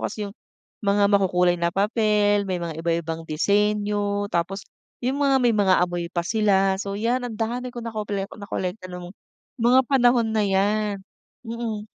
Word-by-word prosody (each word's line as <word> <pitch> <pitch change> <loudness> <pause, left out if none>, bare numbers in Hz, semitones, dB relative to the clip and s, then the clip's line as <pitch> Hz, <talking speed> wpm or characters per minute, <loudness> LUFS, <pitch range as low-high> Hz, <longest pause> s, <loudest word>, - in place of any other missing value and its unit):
kasi 215 - -5
yung 200 - -13 0.5
mga 200 0 +3
makukulay 180 -3 +3
na 170 0 +1
papel, 205 0 +2
may 185 -2 -2
mga 165 -2 -5
iba-ibang 165 -1 -2
disenyo 205 +3 0
tapos 185 +4 -2 0.4
yung 265 +3 0
mga 275 -1 +4
may 240 - +4
mga 200 -3 +4
amoy 175 -1 -4
pa 175 -2 -1
sila. 195 -3 +2
So 200 -1 -4
'yan 245 +3 0
ang 235 - -6
dami 245 +3 -2
ko 240 - -5
nakople 210 -3 -3
nakolekta 190 -1 -4
ng 180 0 -8 0.5
mga 245 +3 +5
panahon 245 -3 +4
na 215 - +2
'yan. 205 +2 +1 0.5
Mm. 225 -2 -4
205 Hz, 155 wpm, -24 LUFS, 190-225 Hz, 0.5 s, mga